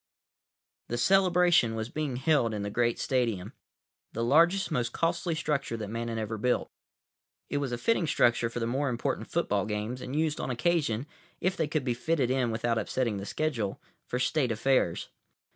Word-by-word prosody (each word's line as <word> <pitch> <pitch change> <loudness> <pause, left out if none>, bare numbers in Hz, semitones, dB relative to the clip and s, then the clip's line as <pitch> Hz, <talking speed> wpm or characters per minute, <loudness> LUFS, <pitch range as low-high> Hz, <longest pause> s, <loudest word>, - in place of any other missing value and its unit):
———— - - -63
The 120 - -1
celebration 180 -6 +4
was 110 +1 -3
being 150 -3 -3
held 130 -4 +2
in 105 - -3
the 100 - -3
Great 120 +1 +1
Stadium, 115 -8 -1 0.6
the 115 - -2
largest, 170 +9 +4
most 125 -5 -1
costly 170 0 0
structure 140 -7 -1
that 105 -2 -5
Man 115 +1 -3
had 115 -1 -3
ever 110 0 -3
built. 125 +3 0 0.8
It - - 0
was 140 -3 -2
a 120 - -1
fitting 185 - +1
structure 120 -4 +3
for 120 - -4
the 115 - -1
more 135 +4 0
important 120 -1 -2
football - - 0
games; 110 +4 -3
and 130 - -5
used 155 -1 0
on - - -3
occasion, 135 -3 0 0.3
if 185 +1 0
they 160 -4 0
could 150 -1 -1
be 125 -2 0
fitted 130 +1 0
in 130 -2 +1
without 115 0 0
upsetting 115 0 -1
the 100 +1 -6
schedule, 125 -11 -2 0.3
for 125 - -2
State 130 0 +1
affairs. 115 -5 +1
125 Hz, 185 wpm, -29 LUFS, 115-155 Hz, 0.8 s, celebration